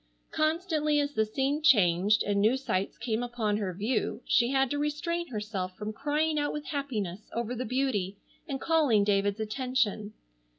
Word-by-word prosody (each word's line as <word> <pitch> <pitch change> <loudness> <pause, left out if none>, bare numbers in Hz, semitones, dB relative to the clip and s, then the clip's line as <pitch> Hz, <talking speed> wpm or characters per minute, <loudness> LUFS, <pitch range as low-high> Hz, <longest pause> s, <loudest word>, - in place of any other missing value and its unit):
Constantly 310 -2 +1
as 290 0 -1
the 220 -5 +1
scene 275 +6 0
changed, 205 - +4
and 200 -1 +1
new 225 +5 +4
sights 195 -7 -2
came 225 0 -2
upon 235 -4 -1
her 200 -3 -2
view, 215 +8 -1
she 240 -1 +3
had 270 0 +2
to 290 - -1
restrain 320 +4 -2
herself 210 -5 -4
from 215 +1 -4
crying 300 +4 0
out 290 - 0
with 300 0 -5
happiness 215 - -4
over 235 +1 -2
the 250 +1 -3
beauty 215 -6 -1 0.3
and 275 -3 -3
calling 290 -11 +3
David's 200 0 +1
attention. 220 -2 -1
240 Hz, 165 wpm, -29 LUFS, 210-290 Hz, 0.3 s, changed